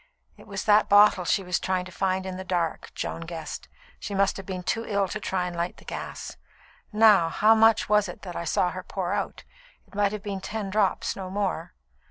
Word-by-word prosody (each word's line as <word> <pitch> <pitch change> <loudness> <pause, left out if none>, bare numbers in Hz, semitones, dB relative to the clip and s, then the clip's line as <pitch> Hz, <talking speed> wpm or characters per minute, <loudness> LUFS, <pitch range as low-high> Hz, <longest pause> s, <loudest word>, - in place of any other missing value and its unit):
"It - - -16
was 195 -2 -4
that 210 0 +4
bottle 205 -3 +6
she 195 - +1
was 180 -1 -1
trying 185 -1 -1
to 185 - -10
find 190 +1 -1
in 190 -1 -4
the 190 - -6
dark," 175 -3 -2
Joan - - -4
guessed. 165 -2 -7 0.3
"She 200 - -5
must 195 0 +2
have 195 - -9
been 185 -2 -4
too 225 +5 -1
ill 200 -3 0
to 215 - -4
try 190 -2 -1
and 175 -1 -5
light 170 +1 -3
the - - -17
gas. - - -6 0.5
Now, 210 -6 +5
how 215 +6 +5
much 225 0 +4
was 210 -2 +3
it - - -10
that 180 -3 -7
I - - -3
saw 180 - +1
her 185 - -6
pour 185 -1 -3
out? - - -3 0.4
It - - -26
might 200 0 +2
have 210 -1 -6
been 195 -2 -4
ten 205 -1 -4
drops 205 -2 +1
no 190 -1 -6
more." 185 -4 -3
190 Hz, 225 wpm, -26 LUFS, 180-205 Hz, 0.5 s, bottle